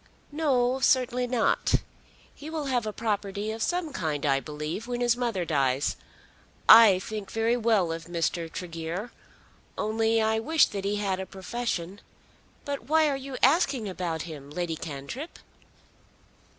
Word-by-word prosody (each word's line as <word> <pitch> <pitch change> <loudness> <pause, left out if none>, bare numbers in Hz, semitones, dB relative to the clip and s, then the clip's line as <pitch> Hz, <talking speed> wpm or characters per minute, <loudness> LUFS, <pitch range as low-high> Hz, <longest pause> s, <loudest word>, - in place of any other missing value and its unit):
"No; 265 -4 +1
certainly 250 -1 +2
not. 240 -2 +2 0.6
He 295 - -9
will 315 -2 -3
have 245 -4 0
a - - -1
property 210 -1 -2
of 220 +1 -6
some 350 +1 -1
kind, 150 -3 -2
I 135 -1 +3
believe, 150 - -5
when 245 -1 -3
his 240 -1 +3
mother 235 -8 -1
dies. 135 -3 +1 0.7
I 220 -4 +9
think 210 +1 -6
very 225 +1 +1
well 220 -7 +2
of 165 0 -5
Mr. 170 -1 -2
Tregear; 175 +4 -5 0.7
only 225 +1 +1
I 220 0 +2
wish 310 +6 +4
that 195 -1 -5
he 205 +1 0
had 195 -2 -1
a 190 - -5
profession. 195 -2 -4 0.6
But 280 -4 -4
why 310 +2 +3
are 280 - 0
you 270 -1 -6
asking 270 - +3
about 175 -4 -3
him, 150 -4 -9
Lady 165 +1 -3
Cantrip?" 155 - -7
215 Hz, 150 wpm, -27 LUFS, 170-245 Hz, 0.7 s, I